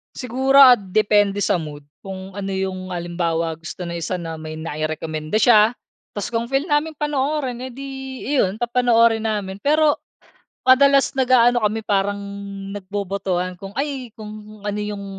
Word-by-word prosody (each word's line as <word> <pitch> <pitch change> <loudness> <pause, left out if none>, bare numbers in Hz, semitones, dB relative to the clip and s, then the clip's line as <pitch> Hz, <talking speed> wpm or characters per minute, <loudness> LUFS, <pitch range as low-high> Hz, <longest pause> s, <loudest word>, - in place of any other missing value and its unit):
Siguro 260 +2 0
ah, 255 -2 +9
depende 205 +1 +2
sa 180 - +2
mood 150 -2 -8 0.2
kung 190 0 -8
ano 195 0 -5
yung 185 -1 -3
halimbawa 170 -2 -2
gusto 165 +2 -7
ng 170 0 -4
isa 170 - -2
na 165 -2 -6
may 155 0 -7
nairekomenda 155 +1 -4
siya. 220 0 +5 0.4
Tapos 205 +3 -4
kung 230 +1 -1
feel 270 +2 0
naming 310 0 0
panoorin 285 -3 -1
eh - - -9
di 275 +2 -7 0.4
iyon, 255 -9 +1
papanoorin 235 -2 +3
namin. 200 -3 -3
Pero 300 +3 +3 0.7
madalas 275 +1 +5
nag-aano 245 -2 +4
kami 215 +1 0
parang 200 -1 0 0.6
nagbobotohan 190 -2 -3
kung 195 +2 -9
ay, 275 -3 -3
kung 215 -1 -10
ano 205 0 -2
yung 205 -1 -5
210 Hz, 145 wpm, -21 LUFS, 185-250 Hz, 0.7 s, ah